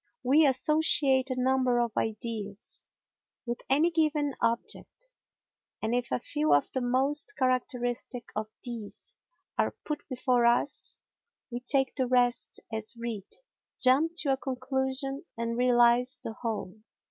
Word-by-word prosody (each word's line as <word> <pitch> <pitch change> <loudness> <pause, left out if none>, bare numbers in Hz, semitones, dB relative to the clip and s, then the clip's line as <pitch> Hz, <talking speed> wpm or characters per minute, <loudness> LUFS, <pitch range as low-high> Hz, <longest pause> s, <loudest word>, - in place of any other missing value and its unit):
We 290 +4 +5
associate 270 -1 +4
a 255 -1 -2
number 255 -1 +2
of 235 -2 -1
ideas 215 -2 -4 0.6
with 240 0 -4
any 305 +6 +4
given 305 -3 +1
object, 235 - -2 0.7
and 220 +2 -1
if 245 -1 -1
a - - +2
few 295 - +1
of 145 - +1
the 260 - -1
most 270 +10 +1
characteristic 250 -2 -1
of 215 0 -2 0.2
these 230 -4 -6 0.5
are - - +1
put 300 -1 -3
before 250 -2 +2
us 245 +4 0 0.5
we 240 - -3
take 270 +1 +2
the 260 -2 0
rest 245 -1 +1
as 220 +1 -4
read, 230 -4 -5 0.5
jump 280 +6 +4
to 275 -3 +2
a - - -1
conclusion 265 +1 -2
and 230 0 -2
realise 245 0 +4
the 225 - -4
whole. 215 -4 -4
255 Hz, 135 wpm, -29 LUFS, 235-270 Hz, 0.7 s, We